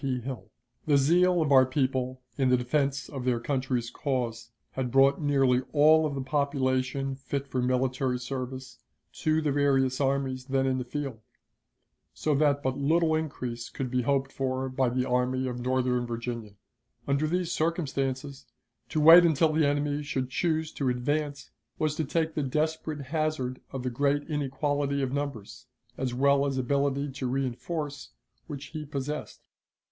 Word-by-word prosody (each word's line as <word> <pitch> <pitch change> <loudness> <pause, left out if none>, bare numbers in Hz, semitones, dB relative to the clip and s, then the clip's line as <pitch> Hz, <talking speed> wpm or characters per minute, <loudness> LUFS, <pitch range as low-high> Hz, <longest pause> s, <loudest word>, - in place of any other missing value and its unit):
P. 130 -3 -1
Hill. 125 0 -7 0.4
The 145 -2 +5
zeal 175 +4 +4
of 145 - -1
our 130 -1 +8
people 130 -1 -1
in 130 -2 +2
the 125 - +5
defense 135 +2 0
of 135 -4 -6
their 125 -2 +1
country's 130 -2 -2
cause 120 -5 -3 0.2
had 130 -2 -3
brought 135 +4 +4
nearly 135 -4 +3
all 155 +1 +5
of 145 - -4
the 135 - -3
population 135 -1 0
fit 140 +1 -4
for 130 -2 -2
military 130 0 0
service 130 0 -6 0.4
to 155 0 +2
the 150 - +1
various 135 -2 +2
armies 135 -1 0
then 135 0 +1
in 130 -1 +1
the - - -2
field, 135 -2 -5 1.0
so 155 - 0
that 145 0 +2
but 130 +1 -1
little 160 +3 +2
increase 125 -7 -3
could 130 -2 -4
be 125 0 +1
hoped 135 +1 0
for 130 -1 -2
by 130 -1 +1
the 125 +1 -1
Army 125 +1 +1
of 125 -1 -4
Northern 125 -1 0
Virginia. 115 -3 -5 0.5
Under 140 +2 +1
these 175 +1 -1
circumstances, 140 -5 -2 0.4
to 155 - -1
wait 165 +3 +9
until 160 -1 +3
the 155 -1 +3
enemy 145 0 0
should 130 -3 -3
choose 160 +2 0
to 135 -3 -1
advance 145 +4 -2 0.3
was 155 -1 0
to 160 - 0
take 160 +2 -1
the 150 - -1
desperate 155 +2 -1
hazard 140 -3 -2
of 130 -2 -5
the 125 - -2
great 145 +3 +1
inequality 145 -1 -1
of 130 - -1
numbers, 135 -4 -5 0.3
as 130 -1 -2
well 140 +2 +3
as 135 -1 -2
ability 140 +2 0
to 130 -1 -4
reënforce, 140 +4 -3 0.4
which 145 -3 -6
he 155 -2 -4
possessed. 145 +1 -5
135 Hz, 160 wpm, -28 LUFS, 130-145 Hz, 1.0 s, wait